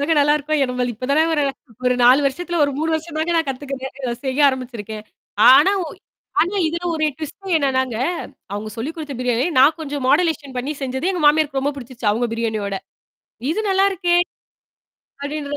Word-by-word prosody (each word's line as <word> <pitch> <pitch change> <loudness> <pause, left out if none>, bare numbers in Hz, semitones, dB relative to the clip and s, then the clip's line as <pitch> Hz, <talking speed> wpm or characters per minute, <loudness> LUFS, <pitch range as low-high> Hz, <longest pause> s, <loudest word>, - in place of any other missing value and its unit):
தாங்க 290 +3 +1
நல்லாருக்கும். 295 +1 +2
என்னா 260 -2 +1
நம்ம 250 0 -1
இப்ப 255 +4 -6
தான 310 +3 +4
ஒரு 295 -2 +2 0.4
ஒரு 250 - +3
4 255 +4 +7
வருஷத்துல 345 +5 -2
ஒரு 285 - 0
3 320 +1 0
வருஷம் 320 0 -4
தாங்க 320 +2 0
நான் 325 -2 +1
கத்துக்குிறேன். 265 0 -5
இத 250 -3 -2
செய்ய 265 +1 -2
ஆரம்பிச்சிருக்கேன். 235 -5 -5 0.5
ஆனா 290 +9 +7
ஒ - - -6 0.5
ஆனா 360 +4 +1
இதுல 340 +2 -3
ஒரு 310 -1 0
டுவிஸ்ட் 355 +5 -6
என்னன்னாங்க, 260 -4 0 0.6
அவுங்க 205 +1 -4
சொல்லிக் 275 +8 -4
குடுத்த 300 -3 -6
பிரியாணி 250 +1 +1
நான் 285 +5 +6
கொஞ்சம் 285 -3 -4
மாடுலேஷன் 295 -3 +1
பண்ணி 265 +4 -2
செஞ்சது 265 +6 -2
எங்க 360 -3 -2
மாமியாருக்கு 295 -2 +3
ரொம்ப 285 +2 0
பிடிச்சிருச்சு 240 -4 -4
அவுங்க 235 +4 0
பிரியாணியோட. 220 -4 -2 0.7
"இது 345 - 0
நல்லாருக்கே?" 380 -2 +2 1.1
அப்டின்ற 290 0 -4
285 Hz, 170 wpm, -20 LUFS, 255-315 Hz, 1.1 s, 4